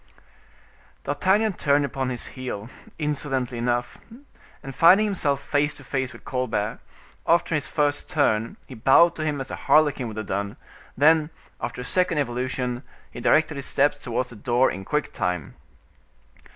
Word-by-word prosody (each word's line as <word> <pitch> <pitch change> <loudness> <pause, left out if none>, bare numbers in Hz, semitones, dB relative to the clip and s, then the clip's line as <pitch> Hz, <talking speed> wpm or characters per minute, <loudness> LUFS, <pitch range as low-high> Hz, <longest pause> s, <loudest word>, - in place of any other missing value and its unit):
D'Artagnan 190 +9 +2
turned 145 -3 +2
upon 135 -1 -3
his 125 -2 -4
heel, 125 -4 -6 0.3
insolently 135 -5 -2
enough, 120 0 -1 0.6
and 135 - -7
finding 180 +9 +6
himself 160 -9 0
face 145 0 0
to - - -12
face 130 -2 -2
with - - -14
Colbert, 115 -4 -2 0.5
after 170 0 +3
his 150 - 0
first 145 -1 0
turn, 115 -10 +1
he - - -10
bowed 135 +8 +5
to 155 - -2
him 150 -2 -1
as 135 0 -6
a - - -3
harlequin 145 -5 +4
would 110 -1 -8
have 110 - -3
done; 100 +3 -3 0.4
then, 155 +1 +4 0.3
after - - -4
a - - -6
second 180 +2 +1
evolution, 125 -2 -2 0.3
he 120 - -8
directed 155 +4 +3
his 140 - -3
steps 145 +1 +2
towards 125 +1 -2
the - - -10
door 120 +4 +2
in 95 +1 -7
quick 150 +7 -1
time. 90 - -2
135 Hz, 160 wpm, -24 LUFS, 120-150 Hz, 0.6 s, finding